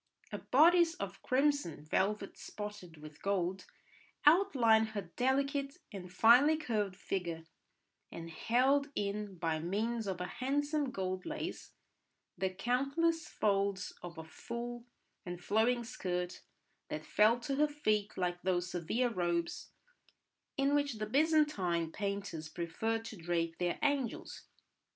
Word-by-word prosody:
A - - -4
bodice 335 +4 +5
of - - -6
crimson 265 - +1
velvet 200 +5 0
spotted 205 -6 -8
with 150 0 -12
gold 190 -1 -1 0.6
outlined 255 - +5
her 180 -4 -5
delicate 275 +2 0 0.2
and 180 -3 -7
finely 245 +11 +6
curved 210 -10 -1
figure, 175 -4 -3 0.7
and 165 0 -7
held 265 - +2
in 200 -1 -3
by 165 -2 -1
means 215 +6 -1
of 185 -2 -2
a 180 - -2
handsome 285 - -1
gold 185 -4 -3
lace - - -5 0.6
the 190 +1 0
countless 275 - 0
folds 200 -2 0
of 175 -1 -8
a 160 - -6
full 235 +8 -6 0.4
and 175 -1 -6
flowing 225 +6 +2
skirt, 180 -6 -3 0.5
that - - -5
fell 220 +3 +4
to 275 +2 -2
her 300 +1 +4
feet 215 -9 -1
like 175 -1 -1
those 180 -1 0
severe 215 +9 0
robes 175 -4 -1 0.9
in 275 +1 +2
which 285 -2 +2
the 215 -1 -3
Byzantine 220 - +2
painters 200 -6 -4
preferred 220 +8 -2
to 220 -2 -7
drape 165 -1 -2
their 175 -1 0
angels. 280 -5 -1
210 Hz, 125 wpm, -34 LUFS, 180-265 Hz, 0.9 s, finely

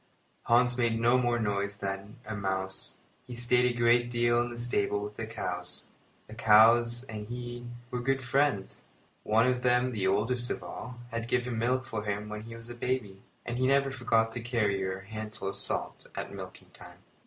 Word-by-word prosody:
Hans 125 +1 +4
made 115 -2 +2
no 120 +2 +4
more 120 -1 +2
noise 100 -2 -1
than 100 +1 -5
a 110 - -4
mouse. 95 -1 -3 0.3
He 125 - -7
stayed 125 +1 +3
a 120 - -6
great 120 +1 +4
deal 120 0 +3
in 120 - -2
the 120 - -7
stable 105 -4 +1
with 105 +1 -5
the 110 +1 -5
cows. 90 -5 -4 0.4
The 110 - -12
cows 115 +2 +5
and 110 -5 -7
he 120 0 -6 0.2
were 125 - -2
good 135 +1 0
friends. 130 -5 0 0.4
One 110 +2 +3
of 125 -1 +1
them, 125 0 +3
the 100 -5 0
oldest 120 +6 +1
of - - -3
all, 125 -1 -7
had 115 0 -3
given 125 -1 0
milk 130 +3 +1
for 110 -5 -4
him 105 0 -3
when 105 0 -5
he 115 0 -8
was 115 0 -10
a - - -5
baby, 120 -5 -2 0.2
and 120 +1 -3
he 130 - +3
never 140 0 +3
forgot 115 -4 +2
to 120 +1 -5
carry 110 -5 0
her 95 0 -2
a - - -16
handful 110 -1 -6
of - - -6
salt - - -3
at - - -5
milking - - -9
time. - - -13
115 Hz, 200 wpm, -30 LUFS, 105-125 Hz, 0.4 s, cows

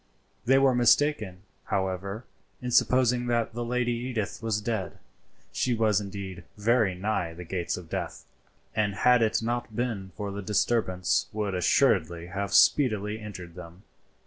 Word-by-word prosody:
They 135 +2 +5
were 135 -1 +4
mistaken, 120 -6 +2 0.2
however, 95 +3 -2 0.3
in 125 0 -4
supposing 125 0 +3
that 120 -2 0
the 120 +1 -3
Lady 125 0 0
Edith 120 -4 -3
was 110 -2 0
dead. 110 -3 -3 0.5
She 125 -2 0
was 110 -2 +2
indeed 95 -3 -7
very 110 -2 +2
nigh 90 -3 -2
the 90 - -8
gates 90 0 -3
of 90 -2 -9
death, - - -5 0.5
and 105 -2 0
had 125 +3 +4
it 110 0 +1
not 120 -1 -3
been 110 -6 -3
for 100 -1 -4
the 100 +1 -5
disturbance 95 -2 +1
would 105 -2 -2
assuredly 90 - +2
have 100 +3 -4
speedily 110 -6 +3
entered 95 -5 -9
them. 90 +2 -12
105 Hz, 145 wpm, -27 LUFS, 95-120 Hz, 0.5 s, They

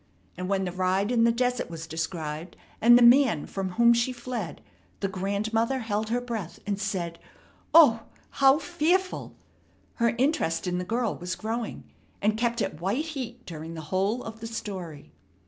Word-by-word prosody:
and 180 +1 -5
when 195 -1 +1
the 180 - -3
ride 185 +4 0
in 230 -2 +4
the 235 - +5
desert 245 -1 0
was 165 -1 -7
described, 160 0 -5 0.2
and 240 +2 +8
the 245 - +5
man 240 - +5
from 190 -2 -4
whom 235 +3 +6
she 235 +2 +1
fled, 240 -8 -5 0.4
the 195 - 0
grandmother 215 +6 -1
held 220 -3 -2
her 240 +2 +1
breath, 230 -8 -5
and 200 -1 -2
said, 170 -5 -3 0.5
"O, 290 -9 +7 0.4
how 270 +1 +7
fearful!" 350 +3 0 0.6
Her 235 -1 +2
interest 250 - +1
in 180 0 -1
the - - -2
girl 230 +3 -1
was 180 +1 -4
growing, 225 +1 -4 0.4
and 215 +1 +1
kept 235 0 0
at 150 - -5
white 210 - 0
heat 250 -6 -6
during 165 0 -7
the 160 - -6
whole 200 +6 0
of 225 0 -8
the 230 - -6
story. 185 -9 -6
220 Hz, 170 wpm, -27 LUFS, 185-240 Hz, 0.6 s, and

